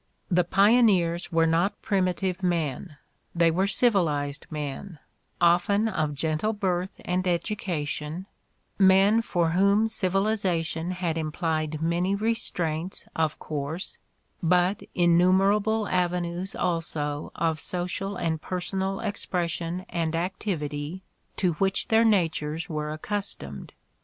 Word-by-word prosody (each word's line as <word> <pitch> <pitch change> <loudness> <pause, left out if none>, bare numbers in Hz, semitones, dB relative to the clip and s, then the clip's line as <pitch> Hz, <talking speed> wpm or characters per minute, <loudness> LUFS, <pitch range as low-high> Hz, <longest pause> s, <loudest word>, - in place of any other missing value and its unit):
The 180 0 +4
pioneers 195 -3 +3
were 165 -1 +3
not 165 +5 +1
primitive 185 -2 0
men, 165 -3 -2 0.4
they 170 -1 +4
were 190 +4 +1
civilized 165 - +1
men, 150 +4 -5 0.4
often 180 +5 +3
of 155 -8 -1
gentle 160 +8 0
birth 185 -3 -2
and 185 +1 0
education, 170 -3 -2 0.5
men 195 +3 +6
for 170 -7 0
whom 200 +5 +3
civilization 190 -5 0
had 175 -3 -2
implied 155 -1 -2
many 175 +4 +1
restraints, 185 -6 -1
of 160 -2 0
course, 155 +4 -5 0.4
but 180 +3 +2
innumerable 195 +5 +3
avenues 180 +1 -1
also 155 -4 -2
of 160 -2 0
social 180 +3 -3
and 160 -3 -2
personal 190 +2 -2
expression 180 -4 -3
and 165 -2 -2
activity 165 -2 -3 0.3
to 180 -3 +1
which 195 +3 +1
their 225 0 +5
natures 165 -6 +1
were 150 -2 -3
acctistomed. 160 - -4
175 Hz, 105 wpm, -26 LUFS, 160-195 Hz, 0.5 s, men